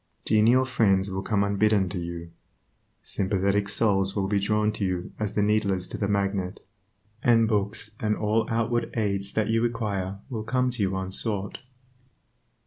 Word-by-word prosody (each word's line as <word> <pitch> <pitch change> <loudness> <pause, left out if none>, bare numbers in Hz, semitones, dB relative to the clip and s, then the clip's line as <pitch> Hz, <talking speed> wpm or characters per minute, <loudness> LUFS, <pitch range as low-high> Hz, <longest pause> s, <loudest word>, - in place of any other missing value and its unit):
Genial 115 +4 +4
friends 100 -6 +2
will 95 0 -2
come 100 0 +1
unbidden 100 -1 +2
to 95 - -3
you; 85 -1 -6 0.7
sympathetic 100 +1 0
souls 100 -2 +1
will 100 -2 0
be 100 0 +1
drawn 105 +2 +1
to 105 - -4
you 90 -2 -2
as 105 -1 -2
the 105 - +2
needle 105 -1 +2
is 95 -1 -2
to - - -5
the 100 - -1
magnet; 100 -2 -1 0.6
and 115 -2 +4
books 105 0 -1
and 105 -1 0
all 110 +1 +1
outward 115 +1 0
aids 100 -2 0
that 110 -1 0
you 115 0 +2
require 105 -5 -2
will 115 -4 -4
come 125 +3 0
to 120 -3 -4
you 95 -1 0
unsought. 95 +1 -3
100 Hz, 165 wpm, -26 LUFS, 95-110 Hz, 0.7 s, Genial